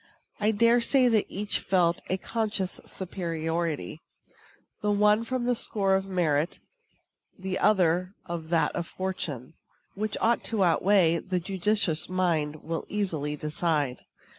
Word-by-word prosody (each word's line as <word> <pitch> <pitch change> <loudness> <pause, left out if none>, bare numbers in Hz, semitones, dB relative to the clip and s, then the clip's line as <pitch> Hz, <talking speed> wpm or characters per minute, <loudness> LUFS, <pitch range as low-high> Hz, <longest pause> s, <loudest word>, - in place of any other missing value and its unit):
I 210 0 +2
dare 230 +3 +4
say 255 +1 +4
that 220 -3 +2
each 205 +1 -2
felt 175 -3 +1
a 185 - +1
conscious 210 -3 -2
superiority 165 - -3 0.8
the 210 - 0
one 210 +2 +3
on 255 -1 -1
the 245 +1 +2
score 200 -4 +1
of 190 0 +1
merit, 165 -4 0 0.8
the 190 0 -3
other 185 -2 +2
on 170 -2 -5
that 165 0 +1
of 170 -1 -3
fortune. 165 -9 -4 0.4
Which 215 +1 -3
ought 235 +1 +2
to 220 -4 +1
outweigh 175 -1 +3
the 185 0 -2
judicious 190 -2 -1
mind 160 -5 0
will 165 0 -3
easily 160 -8 -2
decide. 150 -3 -1
185 Hz, 135 wpm, -27 LUFS, 165-210 Hz, 0.8 s, dare